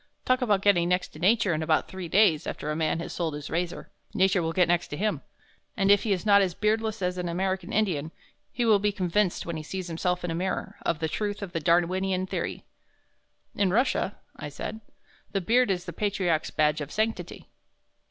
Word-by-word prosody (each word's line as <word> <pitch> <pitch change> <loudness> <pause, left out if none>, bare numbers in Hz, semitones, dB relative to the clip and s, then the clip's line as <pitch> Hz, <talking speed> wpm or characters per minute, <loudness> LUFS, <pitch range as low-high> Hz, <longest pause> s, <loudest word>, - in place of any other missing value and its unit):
Talk 255 +1 +2
about 205 -5 +2
getting 175 -4 +4
next 180 0 +1
to 155 - -13
Nature 200 +1 +3
in 155 - -1
about 160 0 +1
three 185 -2 -6
days 165 -4 +3
after 150 - -4
a - - -2
man 160 0 0
has - - -6
sold 165 -4 -2
his 150 0 -7
razor, 175 +1 -3 0.2
Nature 190 -1 +3
will 165 0 -1
get 180 +1 +3
next 175 0 +1
to 145 - -6
him, 210 +2 -1 0.6
and 195 -1 +4
if 205 - +6
he 220 - -2
is 190 +1 0
not 200 -1 +6
as 180 -3 0
beardless 220 0 0
as 180 0 -1
an 175 -1 -2
American 185 +1 -2
Indian, 165 -8 0 0.4
he 240 - -1
will 215 -3 +5
be 210 +1 +1
convinced 190 0 0
when 170 -1 -4
he - - -4
sees 185 +3 -5
himself 180 +2 -1
in 175 - -2
a - - -1
mirror, 185 +3 -3
of 165 - 0
the 160 - -1
truth 205 +5 -3
of 190 - -6
the 165 - -2
Darwinian 180 +3 +1
theory." - - -4 0.9
"In 200 -2 +1
Russia," 220 -1 +1 0.2
I - - -7
said, 220 +9 -6 0.5
"the 195 - +1
beard 240 +6 +3
is 180 -2 -1
the 170 - -6
patriarch's 185 -5 0
badge 150 0 +1
of 145 0 -6
sanctity." 220 +1 -2
185 Hz, 210 wpm, -27 LUFS, 170-205 Hz, 0.9 s, if